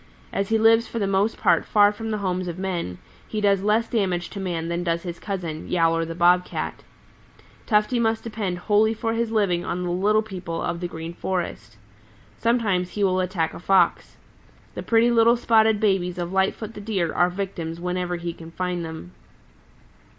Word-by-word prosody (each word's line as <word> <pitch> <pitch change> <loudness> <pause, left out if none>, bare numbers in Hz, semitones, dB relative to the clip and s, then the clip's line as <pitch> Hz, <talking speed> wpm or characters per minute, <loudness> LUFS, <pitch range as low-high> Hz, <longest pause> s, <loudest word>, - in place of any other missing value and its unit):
As 195 0 -1
he 225 - +3
lives 225 +1 +4
for - - -6
the 210 - 0
most 195 +3 +1
part - - +3
far 205 -1 +4
from 225 +1 -6
the 215 - -1
homes 185 -2 -2
of 170 0 -5
men, 175 - -3 0.3
he 215 - -3
does 200 -2 +3
less 215 +3 +2
damage 185 -6 -1
to 200 - -6
man 170 -4 -3
than 170 +1 -2
does 170 -1 -1
his 175 -2 -6
cousin, 175 -6 -5
Yowler 165 -1 +2
the 165 0 -6
Bob 175 +1 +4
Cat. - - -5 0.8
Tufty 215 +2 +2
must 225 -1 +1
depend 210 -5 -3
wholly 210 +4 +2
for 225 0 -2
his 230 0 -1
living 200 -6 +1
on 180 +1 -3
the 175 - -2
little 210 +4 +2
people 180 -5 -6
of 170 - -2
the 175 - -3
Green 165 0 -7
Forest. 170 - -4 0.6
Sometimes 215 -7 +1
he 205 - -2
will 185 -1 +2
attack 180 -3 -1
a - - -8
Fox. 190 +2 +2 0.6
The - - -5
pretty 230 +1 +3
little 235 +1 +5
spotted 220 -2 +3
babies 190 -4 +1
of 175 +1 -4
Lightfoot 195 +3 0
the 205 - -8
Deer 195 -6 -1
are 175 0 +3
victims 175 -3 -5
whenever 180 0 -2
he 170 0 -4
can 165 0 -11
find 180 0 -3
them. 160 - -8
190 Hz, 190 wpm, -24 LUFS, 175-215 Hz, 0.8 s, little